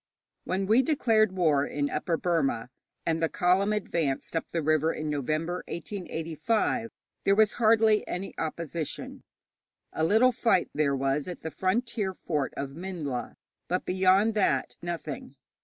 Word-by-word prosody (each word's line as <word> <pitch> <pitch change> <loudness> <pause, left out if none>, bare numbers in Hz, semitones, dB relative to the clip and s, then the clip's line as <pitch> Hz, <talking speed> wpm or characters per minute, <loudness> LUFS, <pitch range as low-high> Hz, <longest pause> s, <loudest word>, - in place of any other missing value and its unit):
When 190 +1 -1
we 220 +6 +5
declared 225 -7 +3
war 160 -7 +2
in 145 0 -1
Upper 165 +2 -1
Burma, 140 -10 0 0.3
and 165 0 0
the 165 - +2
column 190 +2 +2
advanced 170 -9 -1
up 165 - -2
the 165 -2 -2
river 155 +1 +2
in 155 -1 -3
November, 155 +5 -1
1885, 190 +6 -2 0.3
there 195 - +4
was 215 0 +4
hardly 220 -1 +4
any 190 +2 -4
opposition. 160 -1 -4 0.7
A 160 - -1
little 220 +9 +5
fight 230 -6 +2
there 145 -2 +1
was 135 +3 0
at 180 - -6
the 160 - -4
frontier 205 +1 -1
fort 150 -7 -2
of 140 -1 -3
Minhla, 160 -6 -5 0.3
but 180 +1 -1
beyond 190 +4 +3
that 135 -11 +1
nothing. 160 -6 -5
175 Hz, 140 wpm, -28 LUFS, 155-205 Hz, 0.7 s, we